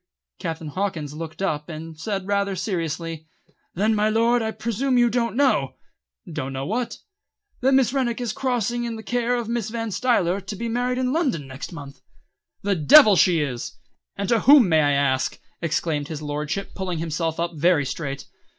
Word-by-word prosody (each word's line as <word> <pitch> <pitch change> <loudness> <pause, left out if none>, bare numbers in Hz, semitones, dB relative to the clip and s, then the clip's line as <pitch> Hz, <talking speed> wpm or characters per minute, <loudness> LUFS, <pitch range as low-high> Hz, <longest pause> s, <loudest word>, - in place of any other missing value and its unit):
Captain 160 -2 -4
Hawkins 160 -4 -3
looked 160 +4 -6
up 150 -4 -2
and 160 0 -7
said 195 +4 -3
rather 200 0 0
seriously: 165 -4 -3 0.5
"Then, 215 +5 +2
my 210 0 +2
Lord, 230 +2 +3
I 220 - -1
presume 235 +4 -1
you 240 -1 +4
don't 235 -1 0
know 275 0 +2 0.3
" 175 -7 -16
"Don't 135 -3 -4
know 135 0 -3
what?" 230 - -2 0.6
"That 265 +2 +3
Miss 265 -2 +3
Rennick 250 -4 0
is 240 -3 -2
crossing 240 -3 -1
in 235 -1 -3
the 220 - -8
care 245 +2 0
of 240 -2 -3
Mrs. 230 -3 -2
Van 225 -1 -3
Stuyler, 200 -5 +1
to 195 +2 -6
be 235 +4 -4
married 245 +2 -1
in 255 0 0
London 265 - 0
next 135 +2 -8
month." 140 -4 -10 0.6
"The 200 0 +1
devil 205 - +7
she 175 -3 +4
is! 125 -5 -4 0.4
And 200 0 -3
to 235 - +4
whom, 275 -2 +7
may 160 -2 +4
I 145 -1 +3
ask?" 135 -2 +1 0.2
exclaimed 160 -3 -1
his 155 -1 -6
lordship, 150 +6 -3
pulling 185 -3 -3
himself 165 0 -2
up 170 0 -1
very 160 -1 +2
straight. 140 -1 -4
195 Hz, 185 wpm, -23 LUFS, 155-235 Hz, 0.6 s, devil